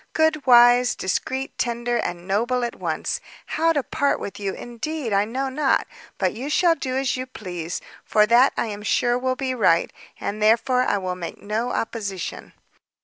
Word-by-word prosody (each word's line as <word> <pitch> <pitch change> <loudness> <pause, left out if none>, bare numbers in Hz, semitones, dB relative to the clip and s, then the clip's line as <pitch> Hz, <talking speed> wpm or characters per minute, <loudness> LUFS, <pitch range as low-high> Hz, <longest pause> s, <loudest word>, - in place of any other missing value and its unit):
good, 315 -3 +1
wise, 245 0 +6
discreet, 260 +8 -2
tender, 240 0 0
and 175 -3 -4
noble 240 +6 +1
at 240 - -2
once! - - -2 0.3
how 330 +1 +1
to 290 -4 0
part 285 +1 0
with 200 - -6
you, 200 -1 -2
indeed, 240 +1 -4
I 200 +1 +3
know 260 +5 -2
not, 270 +1 +1 0.3
but 185 -2 0
you 255 +6 -5
shall 340 +2 +4
do 260 -5 -3
as 270 -1 0
you 255 0 -4
please, 180 -8 -6 0.2
for 210 0 +4
that 240 +5 +5
I - - +1
am 210 -2 -6
sure 240 +3 +1
will 255 0 0
be 260 0 -2
right, 185 -9 +2 0.3
and 210 +1 -4
therefore 235 +4 +3
I 205 - +1
will 185 -2 -3
make 175 -2 -7
no 215 +4 -2
opposition." 200 -7 -4
240 Hz, 180 wpm, -23 LUFS, 205-260 Hz, 0.3 s, wise